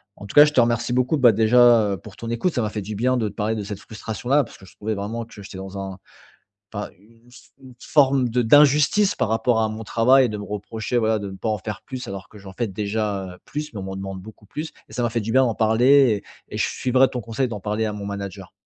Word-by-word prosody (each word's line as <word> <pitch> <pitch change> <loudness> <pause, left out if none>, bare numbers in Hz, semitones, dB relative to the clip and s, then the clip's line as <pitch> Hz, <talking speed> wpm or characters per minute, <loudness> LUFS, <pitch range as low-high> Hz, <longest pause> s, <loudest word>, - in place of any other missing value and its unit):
En 105 - -11
tout 100 - -9
cas, 145 - +10
je 150 - -1
te - - +3
remercie 115 0 0
beaucoup, 125 +5 +1
bah 125 -4 +6
déjà, 115 -1 +5
heu, - - -3
pour 95 +2 -13
ton 115 - -7
écoute. 140 +10 0
Ça 120 - +1
m'a 105 - -1
fait 105 - -4
du 105 +2 -6
bien 125 +4 +1
de 110 -3 0
te - - -13
parler 110 +2 -1
de 105 - -4
cette 100 -1 -6
frustration 110 +2 -7
là, 145 +2 +5
parce - - -13
que 95 - -16
je - - -18
trouvais 110 +1 -3
vraiment 110 +4 -4
que 110 -2 -13
j'étais 95 - -10
dans 95 +1 -7
un 95 -1 -6 0.7
pas - - -5
une 115 +3 -23
f 120 - -17
une 130 -2 -13
forme 135 -2 +3
de 120 +1 0
d'injustice 150 - +4
par - - -1
rapport 110 +1 +1
à 110 - +1
mon 110 +1 -6
travail, 130 +4 +4
de 105 - -4
me 105 - -6
reprocher, 110 +4 -4
voilà, 110 -1 +2
de 100 -1 -5
ne 95 - -9
pas 110 - -4
en 110 - 0
faire 105 +1 -6
plus, 130 -1 -7
alors 95 -2 -7
que 105 - -15
j'en 95 -1 -11
fais 120 +4 -2
déjà, 100 0 -2
heu, - - -18
plus 150 +1 -5
mais 105 - -6
on - - -5
m'en 95 0 -6
demande 95 -1 -6
beaucoup 110 +2 -14
plus. 155 +9 -6 0.2
Et - - -14
ça 125 - -2
m'a 120 - +1
fait 115 0 -1
du 110 +2 -4
bien 130 +2 +5
d'en 115 -3 -1
parler 115 0 +4 0.3
et - - -12
et - - -3
je - - +2
suivrai 130 +1 +2
ton 125 - -4
conseil 115 +4 -2
d'en 105 -5 -6
parler 105 +2 -1
à 105 - -2
mon 105 -1 -6
manager. 100 -2 -6
110 Hz, 285 wpm, -22 LUFS, 105-125 Hz, 0.7 s, cas